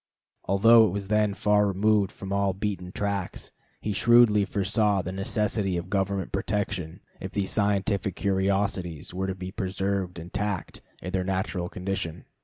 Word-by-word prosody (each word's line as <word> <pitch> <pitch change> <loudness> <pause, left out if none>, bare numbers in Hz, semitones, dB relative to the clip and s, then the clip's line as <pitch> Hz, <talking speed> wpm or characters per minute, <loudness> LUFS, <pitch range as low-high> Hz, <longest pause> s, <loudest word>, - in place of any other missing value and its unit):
Although 110 +4 +6
it 90 - -3
was 100 -1 -4
then 105 -1 +2
far 105 0 +3
removed 100 +1 +2
from 95 0 -6
all 100 -1 +1
beaten 95 -3 -3
tracks, 100 -2 -3 0.3
he 105 - -2
shrewdly 115 -1 +5
foresaw 100 0 +1
the 90 - -4
necessity 95 0 -1
of 85 +1 -6
government 95 -1 -1
protection, 95 -4 -2 0.2
if 95 - -6
these 100 -2 -1
scientific 100 -2 0
curiosities 95 -5 -1
were 95 +1 -2
to 95 - -2
be 95 0 -6
preserved 95 -2 -2
intact 90 +2 -4 0.2
in 90 - -4
their 95 0 0
natural 95 -1 -2
condition. 90 -3 -4
95 Hz, 150 wpm, -26 LUFS, 95-105 Hz, 0.3 s, Although